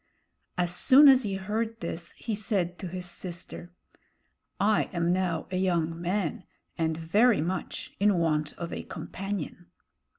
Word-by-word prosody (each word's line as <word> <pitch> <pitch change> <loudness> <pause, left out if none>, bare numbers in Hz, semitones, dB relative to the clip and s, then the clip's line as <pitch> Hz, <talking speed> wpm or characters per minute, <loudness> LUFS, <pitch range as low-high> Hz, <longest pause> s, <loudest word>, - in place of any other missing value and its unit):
As 175 -1 +1
soon 275 +8 +7
as 265 -1 +8
he 200 -5 -2
heard 220 +4 -2
this, 170 0 -6
he 225 - -5
said 195 -4 -1
to 185 - -5
his 180 +1 -6
sister: 175 0 -7 0.9
"I 210 +1 +3
am 170 0 +1
now 180 -3 0
a 185 - -1
young 170 -3 0
man 180 -1 -1 0.3
and 160 -2 -1
very 205 +8 +3
much 180 +4 -3
in 200 -1 +4
want 155 -3 0
of 170 0 -6
a - - -4
companion." 190 -3 -6
180 Hz, 145 wpm, -28 LUFS, 170-205 Hz, 0.9 s, as